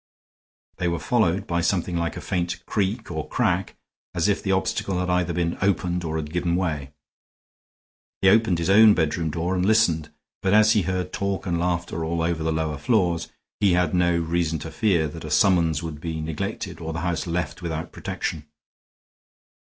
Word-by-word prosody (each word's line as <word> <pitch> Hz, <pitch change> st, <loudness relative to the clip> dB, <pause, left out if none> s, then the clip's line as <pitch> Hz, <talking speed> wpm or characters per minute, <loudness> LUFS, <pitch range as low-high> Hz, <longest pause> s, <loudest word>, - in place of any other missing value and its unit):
They 90 Hz, -, -1 dB
were 85 Hz, 0 st, 0 dB
followed 105 Hz, -4 st, +1 dB
by 85 Hz, -2 st, 0 dB
something 90 Hz, 0 st, 0 dB
like 85 Hz, -2 st, -2 dB
a -, -, -5 dB
faint 90 Hz, 0 st, -3 dB
creak 105 Hz, +1 st, -2 dB
or 80 Hz, -2 st, -4 dB
crack, 95 Hz, -6 st, 0 dB, 0.4 s
as 85 Hz, +2 st, +2 dB
if 105 Hz, -, +1 dB
the 95 Hz, -, -1 dB
obstacle 95 Hz, 0 st, 0 dB
had 90 Hz, 0 st, -1 dB
either 90 Hz, -1 st, +1 dB
been 85 Hz, -1 st, -1 dB
opened 90 Hz, -2 st, 0 dB
or 80 Hz, -1 st, -3 dB
had 75 Hz, -1 st, -4 dB
given 85 Hz, -1 st, 0 dB
way. 80 Hz, -7 st, -2 dB, 1.3 s
He -, -, +6 dB
opened 110 Hz, -3 st, +4 dB
his 85 Hz, +3 st, 0 dB
own 110 Hz, +1 st, +7 dB
bedroom 80 Hz, 0 st, 0 dB
door 85 Hz, +4 st, -2 dB
and 90 Hz, -1 st, 0 dB
listened, 90 Hz, -8 st, +2 dB, 0.3 s
but 95 Hz, +1 st, +2 dB
as 110 Hz, 0 st, +6 dB
he 105 Hz, -, +3 dB
heard 90 Hz, 0 st, -2 dB
talk 100 Hz, -1 st, -2 dB
and 85 Hz, -3 st, -1 dB
laughter 85 Hz, -1 st, -1 dB
all 80 Hz, +1 st, -1 dB
over 80 Hz, -1 st, -1 dB
the 80 Hz, -, 0 dB
lower 80 Hz, -2 st, -2 dB
floors, 85 Hz, -, +1 dB, 0.3 s
he 100 Hz, -3 st, +4 dB
had 90 Hz, -2 st, +2 dB
no 85 Hz, -1 st, +3 dB
reason 85 Hz, -1 st, 0 dB
to 80 Hz, -, -6 dB
fear 95 Hz, -9 st, +2 dB
that 80 Hz, +3 st, -9 dB
a 80 Hz, -, -6 dB
summons 80 Hz, -1 st, +3 dB
would 80 Hz, -3 st, -6 dB
be 80 Hz, -1 st, -4 dB
neglected 80 Hz, +1 st, -4 dB
or 80 Hz, 0 st, -4 dB
the 80 Hz, -, -3 dB
house 85 Hz, 0 st, -2 dB
left 90 Hz, +1 st, -3 dB
without 80 Hz, -2 st, -4 dB
protection. 75 Hz, -1 st, -4 dB
85 Hz, 185 wpm, -24 LUFS, 80-95 Hz, 1.3 s, own